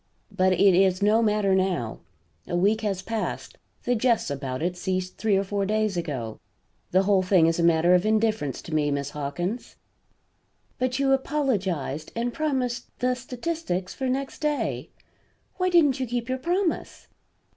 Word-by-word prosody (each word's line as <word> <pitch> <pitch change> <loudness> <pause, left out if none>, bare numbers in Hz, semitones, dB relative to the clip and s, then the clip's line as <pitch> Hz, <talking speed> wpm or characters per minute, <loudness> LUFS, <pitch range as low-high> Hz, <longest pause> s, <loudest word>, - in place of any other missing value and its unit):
But 185 0 +2
it 190 +1 +5
is 185 +1 +3
no 215 +2 +4
matter 210 -3 +2
now. 185 -12 0 0.5
A - - -2
week 205 +5 +2
has 195 -4 -2
passed; 225 +1 -4 0.2
the 245 - +1
jests 235 - +1
about 135 0 -4
it 175 +1 -1
ceased 185 0 -3
three 210 -2 +2
or 195 - +1
four 200 0 -2
days 215 0 0
ago. 135 -10 -4 0.5
The 185 +2 +3
whole 195 -1 +3
thing 185 -3 +4
is 165 +1 +1
a - - +2
matter 170 +1 +4
of 180 0 +4
indifference 215 - 0
to 165 - -8
me, 150 -1 +2
Miss 140 0 -2
Hawkins." 175 - -4 1.0
"But 255 0 0
you 275 -1 +2
apologized; 200 - -1
and 235 +1 -1
promised 255 -5 -1
the 250 0 +1
statistics 250 - -4
for 265 -1 -2
next 270 +1 -3
day. 300 -1 -1 0.7
Why 365 0 +1
didn't 300 -7 +4
you 260 - -1
keep 240 +1 -3
your 260 0 -1
promise." 350 +4 -2
205 Hz, 165 wpm, -25 LUFS, 175-250 Hz, 1.0 s, it